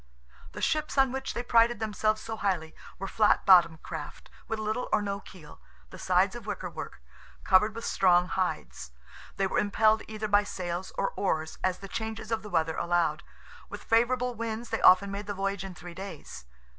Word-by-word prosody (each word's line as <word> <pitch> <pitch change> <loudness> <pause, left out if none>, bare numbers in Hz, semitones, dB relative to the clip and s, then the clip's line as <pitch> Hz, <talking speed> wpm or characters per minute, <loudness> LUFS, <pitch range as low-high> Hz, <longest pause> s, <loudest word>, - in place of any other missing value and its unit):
The - - -6
ships 305 -2 0
on 270 -2 +4
which 265 +1 -4
they 240 - -2
prided 235 0 +3
themselves 215 0 0
so 225 0 -5
highly 180 -7 -2 0.2
were 195 - -5
flat 210 +1 +2
bottomed 170 -4 +6
craft, - - -8 0.2
with 225 - -2
little 215 +3 -2
or - - +4
no 200 -1 -3
keel, 160 - -14 0.3
the - - -10
sides - - +2
of - - -9
wicker - - -4
work, - - -8 0.4
covered 210 +3 +4
with 230 - -6
strong 180 -2 +3
hides. 60 - -3 0.4
They 195 - +1
were 190 - 0
impelled 215 +2 +3
either 215 0 -4
by 205 0 +4
sails 180 -2 -5
or 195 - 0
oars 160 -5 -2
as 185 -1 +1
the 195 - -9
changes 220 +1 -5
of 225 - 0
the 210 - -9
weather 160 -3 0
allowed; 170 -3 +1 0.5
with - - -8
favourable 245 +2 +2
winds 230 0 -5
they 225 - -1
often 195 +2 +6
made 200 +1 -5
the 205 - -3
voyage 195 -1 -2
in 190 -2 -8
three 175 +1 -10
days. 170 - -9
200 Hz, 190 wpm, -28 LUFS, 180-220 Hz, 0.5 s, bottomed